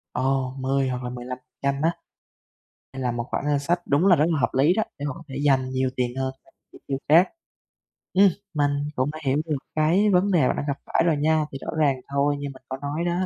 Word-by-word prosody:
Ồ! 130 0 0
10 135 0 +1
hoặc 125 0 -3
là 125 - -3
15% 130 +3 -4
á? 165 +2 +3 1.0
Đây 135 - -6
là 125 -1 0
một 120 0 -2
khoản - - -2
ngân 145 -1 +2
sách 170 +5 0
đúng 145 +7 +3
là 180 - +7
rất 150 - +3
là 160 -3 +1
hợp - - +2
lý 145 +6 +4
đó, 220 +3 +1
để 145 - -4
mà 145 - -2
có 165 - -11
thể 135 - -7
dành 130 -2 +3
nhiều 130 0 0
tiền 125 -1 0
hơn 130 0 -1
cho - - -22 0.2
chi - - -14
tiêu 135 - -1
khác. 170 +5 +6 0.8
Ừm, 195 +1 +6 0.2
mình 145 -2 +2 0.2
cũng 130 +3 0
đã 155 - -8
hiểu 135 +1 +2
được 155 -3 -1 0.2
cái 170 +7 +3
vấn 185 +3 +3
đề 160 -8 +4
bạn - - +1
đang - - -2
gặp 140 -1 -1
phải - - +1
rồi 165 -3 +2
nha. 155 +1 +2
Thì 135 - -5
rõ - - -5
ràng 145 -3 +3 0.2
thôi, 140 +1 +2
như 145 - -4
mình 130 - -17
có 130 - -3
nói 145 +2 -3
đó, 175 +2 0
140 Hz, 250 wpm, -24 LUFS, 130-160 Hz, 1.0 s, là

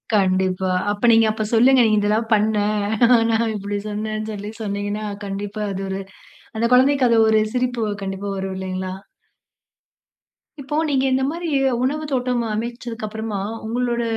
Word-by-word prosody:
கண்டிப்பா. 185 -1 +1 0.2
அப்ப 205 0 -5
நீங்க 225 0 +5
அப்ப 215 0 -3
சொல்லுங்க 250 +3 +6
நீ - - +1
இதெல்லாம் 215 +2 0
பண்ண. 215 0 +2 0.7
நான் 225 0 +1
இப்படி 205 0 -3
சொன்னேன்னு 215 +1 -3
சொல்லி 205 0 -6
சொன்னீங்கன்னா, 205 +1 -3 0.2
கண்டிப்பா 200 +2 -5
அது 195 0 -4
ஒரு 190 0 -3 0.6
அந்த 225 - 0
குழந்தைக்கு 265 0 +4
அது 230 - +4
ஒரு 220 0 +4
சிரிப்பு 245 -2 -1 0.2
கண்டிப்பா 195 +1 -4
வரும் 190 0 -4
இல்லைங்களா. 185 0 -4 1.7
இப்போ 275 +2 -4
நீங்க 270 -2 +1
இந்த 265 0 +2
மாரி 340 +1 -5 0.4
உணவு 300 +4 -1
தோட்டம் 250 -2 0
அமைச்சதுக்கு 235 0 -4
அப்புறமா, 220 -1 -4 0.3
உங்களோட 240 +1 -1
220 Hz, 140 wpm, -21 LUFS, 200-245 Hz, 1.7 s, சொல்லுங்க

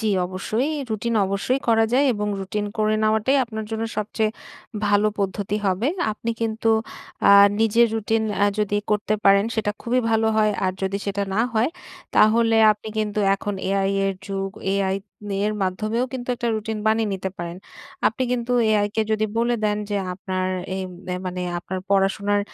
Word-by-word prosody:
জ্বি 220 - 0 0.2
অবশ্যই। 215 +9 -2 0.2
রুটিন 225 +2 -1
অবশ্যই 200 +7 -1
করা 225 -1 +5
যায় 275 +3 +4
এবং 210 0 -2
রুটিন 205 +2 -3
করে 215 0 +2
নেওয়াটাই 220 +5 +2
আপনার 220 -2 -6
জন্য 225 0 -2
সবচেয়ে 215 +1 0 0.6
ভালো 205 +1 +3
পদ্ধতি 200 +1 -1
হবে। 195 +7 +1 0.2
আপনি 230 +2 -4
কিন্তু 225 0 0 0.6
আ - - +9 0.3
নিজের 225 +2 +4
রুটিন 225 0 0
অ্যা 205 - +3
যদি 205 -1 +1
করতে 210 0 +1
পারেন 200 0 +6
সেটা 215 -2 0
খুবই 250 +2 +1
ভালো 225 0 +2
হয়। 215 -1 +3
আর 185 - +1
যদি 195 +1 -1
সেটা 200 0 -1
না 215 - +2
হয় 230 +5 +2 0.5
তাহলে 225 +1 +5 0.2
আপনি 210 +1 -10
কিন্তু 210 -1 -1 0.2
এখন 205 +1 -4 0.2
AI 195 0 +1 0.2
এর 195 - -1
যুগ 195 -1 -3 0.2
AI 195 -1 +1 0.3
নি 195 - -1
এর 215 - -1
মাধ্যমেও 215 +6 -1
কিন্তু 250 -1 -6
একটা 240 -1 -2
রুটিন 220 0 -3
বানিয়ে 220 0 +2
নিতে 190 0 -4
পারেন। 170 0 -5 0.5
আপনি 225 - -4
কিন্তু 245 0 -1 0.2
AI 205 -1 +3
কে 220 - +2
যদি 215 0 +1
বলে 240 +1 +2
দেন, 210 0 +1
যে 205 - 0 0.2
আপনার 185 0 -3 0.3
এম 190 -1 -4 0.2
অ্যা 180 - -1
মানে 180 0 -3 0.2
আপনার 185 +2 -5
পড়াশোনার 200 +1 +2
210 Hz, 175 wpm, -23 LUFS, 195-225 Hz, 0.6 s, আ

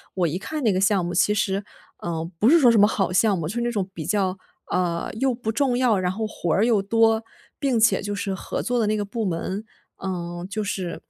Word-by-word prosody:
我 175 -3 +2
一 175 +5 -3
看 305 +5 -5
那 215 -4 +3
个 185 - 0
项 195 -3 +2
目 175 - -3
其 190 +4 +3
实 200 -1 0 0.3
呃， 165 -1 -4
不 225 - +5
是 335 +2 +7
说 245 -4 +6
什 225 - +4
么 205 - +7
好 195 -4 -1
项 200 0 +3
目， 155 -2 -3
就 190 - -4
是 240 - -1
那 240 - 0
种 200 -4 -1
比 160 -3 -6
较 190 -1 +1 0.4
呃， 170 -2 -1
又 265 -2 +1
不 220 -2 -3
重 250 0 +1
要， 235 -6 +3
然 180 0 0
后 220 +3 -3
活 175 -6 -3
儿 215 - +3
又 220 -5 +3
多， 225 +2 +2 0.4
并 265 -5 +1
且 220 0 +4
就 205 0 -3
是 200 -1 -2
合 - - -4
作 245 -1 0
的 215 - +1
那 215 - +1
个 205 - -1
部 215 +2 -3
门， 190 +4 -3 0.4
嗯， 175 -1 -4
就 215 +1 -2
是 190 -4 -4
205 Hz, 265 characters per minute, -24 LUFS, 185-225 Hz, 0.4 s, 是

